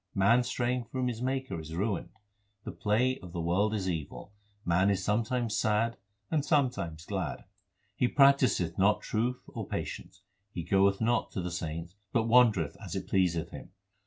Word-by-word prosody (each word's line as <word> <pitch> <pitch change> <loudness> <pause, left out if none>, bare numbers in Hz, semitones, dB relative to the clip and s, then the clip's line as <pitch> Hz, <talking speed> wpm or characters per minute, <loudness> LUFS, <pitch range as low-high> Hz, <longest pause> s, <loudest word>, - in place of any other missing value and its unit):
Man 110 +6 +4
straying 125 0 -1
from 130 +2 -2
his 120 -2 -3
Maker 130 -6 -2
is 80 +1 -7
ruined. 100 +1 -1 0.5
The - - -5
play 125 +5 +1
of 90 -2 -11
the 85 - -3
world 90 +6 +1
is 95 -3 -2
evil; 85 +3 -5 0.3
man 90 +3 +3
is 100 -2 0
sometimes 115 +3 0
sad 115 +1 +1 0.4
and 155 -3 +1
sometimes 125 - 0
glad. - - -3 0.5
He 125 - +2
practiseth 130 - +3
not 100 +2 +3
truth 120 +3 -2
or - - -6
patience; 95 0 -6 0.3
he 85 - -5
goeth 100 +3 +3
not 120 +1 +1
to 95 - -2
the 90 - -3
saints, 85 0 -5 0.2
but 115 - +2
wander 115 -5 +5
eth - - -12
as - - -6
it - - -4
pleaseth 85 -3 +1
him. - - -10
105 Hz, 170 wpm, -30 LUFS, 90-125 Hz, 0.5 s, wander